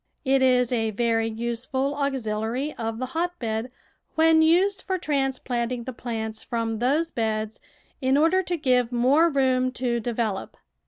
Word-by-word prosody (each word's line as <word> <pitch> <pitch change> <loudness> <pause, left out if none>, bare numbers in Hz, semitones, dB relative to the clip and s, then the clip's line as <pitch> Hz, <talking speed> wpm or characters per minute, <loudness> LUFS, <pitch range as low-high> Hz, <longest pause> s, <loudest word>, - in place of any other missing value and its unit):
It 270 0 +3
is 250 -2 +3
a 225 -2 +1
very 225 +1 +1
useful 235 +4 -2
auxiliary 260 -1 -2
of 225 -1 -4
the 255 - -2
hotbed 255 -7 -3 0.4
when 320 0 +5
used 370 +5 +3
for 380 -1 -2
transplanting 255 -6 -1
the 260 - -6
plants 220 -2 -5
from 225 -2 -2
those 300 +7 +1
beds 220 -1 -2 0.4
in 260 +1 +3
order 330 +5 +4
to 355 -1 -3
give 250 -4 +2
more 265 +8 +4
room 260 -3 +2
to 240 -1 -1
develop. 225 -4 -3
250 Hz, 145 wpm, -25 LUFS, 230-285 Hz, 0.4 s, when